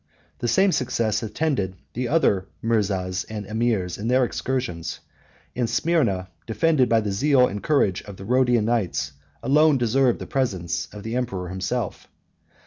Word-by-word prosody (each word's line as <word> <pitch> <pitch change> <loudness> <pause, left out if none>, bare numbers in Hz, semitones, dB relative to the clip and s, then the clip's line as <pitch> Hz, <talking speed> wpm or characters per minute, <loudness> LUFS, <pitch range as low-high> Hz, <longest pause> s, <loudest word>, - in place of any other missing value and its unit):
The 120 - -1
same 190 - +4
success 115 -7 0
attended 110 -4 -1 0.2
the 125 +1 -2
other 105 - +2 0.2
mirzas 95 -5 0
and 105 -2 -5
emirs 110 -5 -1
in 105 - -3
their 125 +1 +4
excursions; 85 -12 -3 0.6
and 120 -2 0
Smyrna, 120 - +1 0.2
defended 130 +3 +2
by 115 -1 +4
the 105 -2 -2
zeal 130 +5 +4
and 100 0 -5
courage 105 -11 +2
of 100 -2 -9
the 95 - -9
Rhodian 125 -2 +3
knights, 90 -12 0 0.3
alone 150 +1 +4
deserved 125 +1 +2
the - - -7
presence 95 -11 -1
of 105 -1 -9
the 115 +2 -4
emperor 95 -8 -2
himself. 95 +4 -3
115 Hz, 150 wpm, -24 LUFS, 95-130 Hz, 0.6 s, same